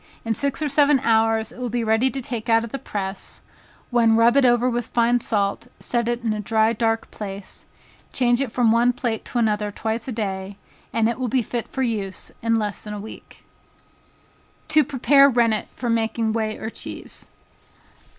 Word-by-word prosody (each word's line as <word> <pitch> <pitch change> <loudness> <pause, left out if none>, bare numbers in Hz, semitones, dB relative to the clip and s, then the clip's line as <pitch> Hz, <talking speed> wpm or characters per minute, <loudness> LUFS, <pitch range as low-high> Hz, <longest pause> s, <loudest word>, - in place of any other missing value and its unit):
In 225 - +1
six 280 +6 -1
or - - +1
seven 285 0 +4
hours 225 -1 +2
it - - -13
will 250 -1 -3
be 240 +1 -1
ready 225 +4 +2
to 270 +2 -5
take 235 -1 -5
out 225 0 +4
of 230 - -7
the 275 - -4
press, 195 -6 -5 0.5
when 230 -2 +4
rub 230 +2 +5
it 280 -2 +5
over 240 0 +4
with 240 -2 -1
fine 240 +1 +2
salt, 205 0 -1
set 235 -1 -1
it 240 0 -2
in 225 -2 0
a 215 - -4
dry 220 +2 +2
dark 225 0 -1
place, 195 -2 -7 0.4
change 245 0 +2
it 265 -5 -2
from 240 -2 +3
one 240 +2 +3
plate 235 -3 -2
to - - -5
another 210 -2 +1
twice 220 +3 -3
a - - -3
day, 195 -3 -4 0.3
and 225 -1 +2
it 235 +2 -2
will 255 - -1
be 250 +1 +1
fit 235 +1 -4
for 265 - -3
use 205 -6 -3
in 230 0 +1
less 210 -2 -1
than 210 -1 -6
a - - -6
week. 215 +2 -11 1.3
To 310 0 +5
Prepare 275 +1 +5
Rennet 230 -4 +1
for 245 - -6
making 225 -1 0
Whey 220 -1 -2
or 220 - -5
Cheese. - - -8
230 Hz, 195 wpm, -23 LUFS, 220-245 Hz, 1.3 s, rub